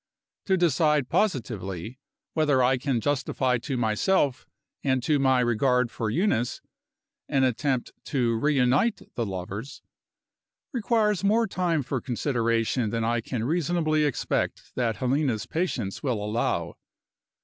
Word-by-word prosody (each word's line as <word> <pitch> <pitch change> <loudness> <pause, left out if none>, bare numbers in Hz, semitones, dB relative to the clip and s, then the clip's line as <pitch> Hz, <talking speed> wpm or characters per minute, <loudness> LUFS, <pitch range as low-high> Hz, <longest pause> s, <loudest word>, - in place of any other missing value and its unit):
To 190 -1 +3
decide 150 -5 +2
positively 115 - -2 0.3
whether 145 -5 +3
I 130 +1 +3
can 130 -2 0
justify 130 -2 0
to 130 +2 -3
myself 125 - +1 0.4
and 130 -3 +1
to 150 -1 +2
my 130 -2 +3
regard 125 +1 +2
for 110 -2 -2
Eunice, 125 - 0 0.7
an 135 -1 +2
attempt 130 0 0
to 120 -5 +1
reunite 140 - +1
the 115 -4 -2
lovers, 100 +6 -6 0.9
requires 215 -4 +1
more 220 +3 +3
time 175 -6 0
for 130 -1 -3
consideration 115 -2 0
than 115 +1 -1
I 120 +1 +1
can 115 -1 -3
reasonably 155 +1 +1
expect 145 - -2
that 120 -3 0
Helena's 130 -4 0
patience 125 - -2
will 125 -6 -1
allow. 85 -6 -1
130 Hz, 125 wpm, -26 LUFS, 115-150 Hz, 0.9 s, To